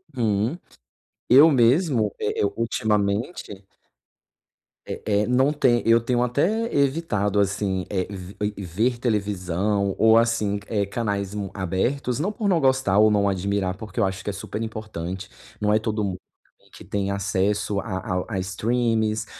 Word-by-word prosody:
Uhum, 110 Hz, +4 st, 0 dB, 0.7 s
eu 140 Hz, +6 st, +8 dB
mesmo, 125 Hz, -, +3 dB
eh -, -, -1 dB
eh, -, -, +3 dB
ultimamente 105 Hz, -, -1 dB, 1.2 s
é -, -, -5 dB, 0.2 s
é, -, -, -3 dB
não 130 Hz, +3 st, +3 dB
tem 130 Hz, -5 st, +2 dB
eu 115 Hz, +1 st, +5 dB
tenho 120 Hz, +1 st, 0 dB
até 180 Hz, -, 0 dB
evitado 130 Hz, -9 st, +1 dB
assim, 100 Hz, -1 st, 0 dB
é 95 Hz, -3 st, -1 dB
ve 95 Hz, -1 st, -9 dB, 0.2 s
ver 110 Hz, +6 st, -1 dB
televisão 100 Hz, -3 st, -1 dB
ou 110 Hz, 0 st, +5 dB
assim, 115 Hz, -3 st, +1 dB
eh, 105 Hz, -3 st, 0 dB
canais 100 Hz, -2 st, -3 dB
mu 100 Hz, -2 st, -4 dB
abertos, 120 Hz, +8 st, -1 dB
não 190 Hz, +7 st, 0 dB
por 215 Hz, -1 st, -3 dB
não 180 Hz, -4 st, +3 dB
gostar 130 Hz, -7 st, +3 dB
ou 110 Hz, -, +6 dB
não 100 Hz, -1 st, +2 dB
admirar, 95 Hz, -1 st, -1 dB
porque 105 Hz, +2 st, -7 dB
eu -, -, +4 dB
acho 95 Hz, 0 st, -4 dB
que -, -, -3 dB
é -, -, -3 dB
super 105 Hz, +2 st, -6 dB
importante. 100 Hz, -4 st, -5 dB, 0.3 s
Não 105 Hz, 0 st, +1 dB
é 110 Hz, -, +4 dB
todo 110 Hz, -1 st, -2 dB
mundo 95 Hz, -2 st, -3 dB, 0.4 s
também -, -, -27 dB
que -, -, -13 dB
tem 100 Hz, -1 st, -2 dB
acesso 100 Hz, +1 st, 0 dB
a 95 Hz, -2 st, -4 dB
a 90 Hz, -2 st, -2 dB
a -, -, 0 dB
streamings 110 Hz, +2 st, 0 dB
105 Hz, 160 wpm, -24 LUFS, 100-120 Hz, 1.2 s, eu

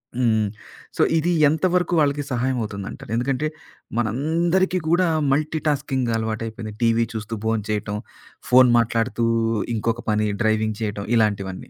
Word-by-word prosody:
హ్మ్. 110 Hz, -4 st, +2 dB, 0.5 s
సో, -, -, +2 dB, 0.2 s
ఇది 170 Hz, +3 st, +1 dB, 0.2 s
ఎంతవరకు 175 Hz, +4 st, +1 dB
వాళ్ళకి 145 Hz, -1 st, +1 dB
సహాయం 125 Hz, +1 st, 0 dB
అవుతుందంటారు. 100 Hz, 0 st, -6 dB
ఎందుకంటే, 130 Hz, +4 st, 0 dB, 0.5 s
మనందరికీ 165 Hz, -, +1 dB
కూడా 175 Hz, +1 st, +3 dB, 0.2 s
మల్టీటాస్కింగ్ 145 Hz, -4 st, 0 dB
అలవాటైపోయింది. 110 Hz, 0 st, -4 dB
టీవీ 115 Hz, 0 st, +3 dB
చూస్తూ 110 Hz, 0 st, -4 dB
భోంచేయటం. 105 Hz, -1 st, -1 dB, 0.5 s
ఫోను 125 Hz, -1 st, +7 dB
మాట్లాడుతూ 115 Hz, 0 st, 0 dB, 0.5 s
ఇంకొక 115 Hz, +2 st, -1 dB
పని 105 Hz, 0 st, +1 dB, 0.2 s
డ్రైవింగ్ 110 Hz, -1 st, +1 dB
చేయటం 105 Hz, -2 st, -3 dB
ఇలాంటివన్నీ. 100 Hz, -4 st, 0 dB
115 Hz, 115 wpm, -22 LUFS, 110-145 Hz, 0.5 s, ఫోను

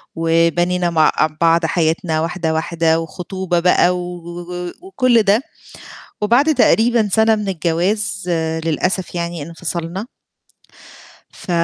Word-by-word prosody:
وبنينا 170 Hz, +2 st, +1 dB
مع 160 Hz, -2 st, +3 dB
أ 155 Hz, -, +3 dB
بعض 165 Hz, 0 st, +3 dB
حياتنا 160 Hz, 0 st, 0 dB
واحدة، 165 Hz, -1 st, -2 dB
واحدة 165 Hz, 0 st, +1 dB
وخطوبة 180 Hz, +2 st, -3 dB
بقى 180 Hz, 0 st, +3 dB
و 180 Hz, 0 st, -6 dB
و 175 Hz, +1 st, -7 dB
وكُلّ 255 Hz, -, +2 dB
ده، 205 Hz, +3 st, +3 dB, 0.8 s
وبعد 265 Hz, +9 st, +3 dB
تقريبًا 230 Hz, -4 st, +3 dB
سَنة 220 Hz, +2 st, +4 dB
من 210 Hz, -1 st, -4 dB
الجواز 185 Hz, +3 st, -1 dB, 0.4 s
للأسف 180 Hz, +3 st, -1 dB
يعني 170 Hz, -2 st, -3 dB
انفصلنا 170 Hz, +4 st, -5 dB, 1.2 s
ف -, -, -14 dB
175 Hz, 115 wpm, -18 LUFS, 165-195 Hz, 1.2 s, سَنة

